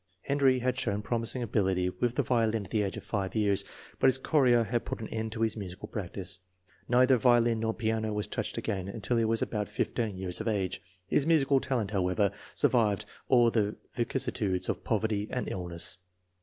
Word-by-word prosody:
Henry 140 -2 +3
had 125 +1 -1
shown 105 -5 -1
promising 120 +2 -1
ability 95 -4 +1
with 120 +7 -1
the - - +2
violin 115 -4 +1
at - - -13
the 110 - +2
age 100 -2 -2
of - - -7
five 100 -2 -3
years, 100 -3 +2 0.4
but - - +5
his 130 -1 +5
chorea 130 -4 +3
had 115 +2 -1
put - - -5
an 110 - -5
end 110 0 -3
to 110 - -5
his 110 -1 +1
musical 95 -4 -7
practice. 95 -2 -4 0.5
Neither 125 +1 +5
violin 120 -1 +4
nor 110 0 -1
piano 110 -1 -1
was 105 0 -1
touched - - -4
again 95 -2 -2
until 110 +4 -2
he 115 - +2
was 115 0 +1
about 105 -2 -3
15 105 -1 -2
years 90 +1 -1
of 110 - -4
age. 95 -4 -1 0.2
His 140 - +1
musical 140 -4 +4
talent, 120 -7 -1
however, 95 0 +1 0.2
survived 110 -5 +3 0.2
all 120 -3 +5
the 105 -2 0 0.2
vicissitudes 115 -7 0
of - - -2
poverty 110 -2 0
and 125 - -3
illness. 90 0 -2
110 Hz, 190 wpm, -29 LUFS, 100-120 Hz, 0.5 s, but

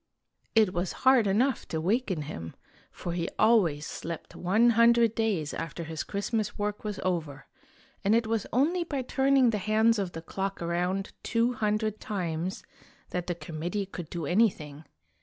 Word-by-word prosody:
It 215 -4 +4
was 175 0 -2
hard 260 -5 +6
enough 235 +6 +1
to 160 - -2
waken 185 -2 0
him, 85 - -7 0.4
for 175 - -5
he 170 -1 -2
always 175 -10 +3
slept 165 0 -6
one 215 +7 +3
hundred 235 0 +5
days 205 -10 -1
after 165 +1 -5
his 160 -1 -4
Christmas 210 +1 -2
work 210 0 -2
was 210 -2 -3
over, 160 -7 -2 0.6
and 205 +3 +4
it 230 0 +2
was 220 -2 -1
only 325 +9 +2
by 285 -5 -3
turning 265 -1 +3
the 210 - -1
hands 220 +2 +3
of 190 -3 -3
the 165 - -7
clock 195 +3 -3
around 180 +3 -1
two 235 +2 +1
hundred 215 -1 -1
times 180 -2 -3 0.5
that 180 -1 -3
the 175 - -1
com 155 -1 -8
mittee 195 +3 -2
could 170 -3 -7
do 170 -3 -4
anything. 160 -6 +1
200 Hz, 165 wpm, -28 LUFS, 170-225 Hz, 0.6 s, hard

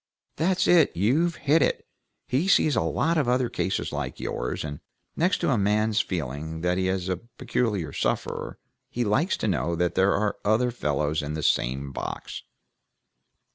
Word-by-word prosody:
"That's 185 +3 +1
it! 170 - +4
You've 150 - +2
hit 155 +3 +2
it! - - +1 0.4
He's 160 +10 +3
seen 155 - +2
lots 110 - +1
of 140 - 0
other 125 -1 +2
cases 95 - -2
like - - -4
yours, - - -3
and 75 -2 -6 0.4
next 175 +4 +2
to - - +2
a 120 - +2
man's 105 +2 +2
feeling 80 - -4
that 90 +1 +1
he's 95 -1 -1
a 95 -1 -1
peculiar 105 - -2
sufferer, - - -2 0.3
he 120 - -1
likes 135 - +1
to - - -2
know 85 -2 0
that 90 +1 0
there 95 +1 +3
are 105 0 0
other 110 +4 +2
fellows 75 - -1
in 75 +1 -4
the 80 - -4
same 70 +3 0
box." - - -6
100 Hz, 165 wpm, -26 LUFS, 80-125 Hz, 0.4 s, it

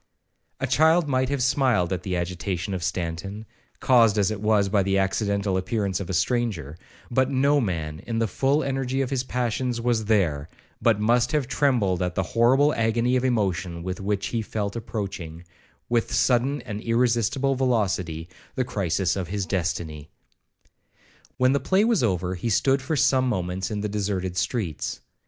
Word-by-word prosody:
A 130 - 0
child 160 +5 +3
might 130 -1 +1
have 140 -3 0
smiled 120 -9 +2
at 90 - -3
the 90 -1 -2
agitation 90 +2 -3
of 95 - -3
Stanton, 90 +4 -4 0.3
caused 115 -5 +4
as 100 0 +2
it 105 -2 -5
was 105 -2 +3
by 100 +1 +2
the 95 0 +1
accidental 100 0 0
appearance 100 0 -1
of 100 - -6
a - - -2
stranger; 100 - -1 0.4
but 130 +2 +2
no 140 +2 +3
man, 80 -7 -3
in 115 -1 -2
the 115 - +2
full 135 - +1
energy 135 -1 -1
of 130 - -5
his 130 -2 0
passions, 125 -1 -2
was 115 -2 0
there, 85 -9 +1 0.3
but 115 -3 +3
must 120 +6 +2
have 145 -5 +1
trembled 120 -11 +1
at 90 -1 -1
the 95 - +1
horrible 130 - +3
agony 115 +2 +1
of 125 - +1
emotion 95 -8 -1
with 95 +3 -4
which 100 0 -1
he 115 - -1
felt 105 -1 -3
approaching, 95 -8 -5 0.4
with 120 -1 0
sudden 130 +2 +1
and 105 -1 -6
irresistible 120 +3 +1
velocity, 95 -11 -1 0.3
the 130 - 0
crisis 95 -5 0
of 95 -3 -3
his 100 +1 -2
destiny. 85 -5 -3 1.3
When 130 +1 +3
the 140 - +2
play 190 +7 +2
was 230 - +2
over, 90 -5 0
he 95 +6 -3
stood 135 +5 +2
for 145 +5 -2
some 130 -1 +3
moments 90 -3 -2
in 105 -1 -3
the 105 - -1
deserted 100 -3 -2
streets. 95 - -2
110 Hz, 170 wpm, -25 LUFS, 95-125 Hz, 1.3 s, caused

